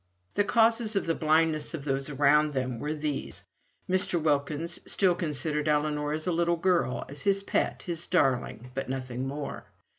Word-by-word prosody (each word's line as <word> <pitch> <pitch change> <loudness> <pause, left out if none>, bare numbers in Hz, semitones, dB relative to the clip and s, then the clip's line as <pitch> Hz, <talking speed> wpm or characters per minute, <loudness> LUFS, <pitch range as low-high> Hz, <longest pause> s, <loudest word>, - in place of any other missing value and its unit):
The 205 - +2
causes 225 0 +2
of 195 - +1
the 165 - +1
blindness 155 0 +1
of 145 -3 -7
those 135 0 0
around 150 +1 +3
them 130 -3 -2
were 150 +3 -2
these: 150 -2 -4 0.4
Mr. 185 -1 +2
Wilkins 150 +1 0
still 190 -3 +3
considered 150 -3 -1
Ellinor 150 0 +1
as 155 0 -3
a 180 - +1
little 170 0 +1
girl, 170 -8 +1
as 140 +1 -8
his 195 -1 +1
own - - -22
pet, - - 0
his 170 -1 -4
darling, 130 -6 0
but 135 -1 -4
nothing 130 -1 -3
more. 140 +1 -5
150 Hz, 175 wpm, -28 LUFS, 140-170 Hz, 0.4 s, around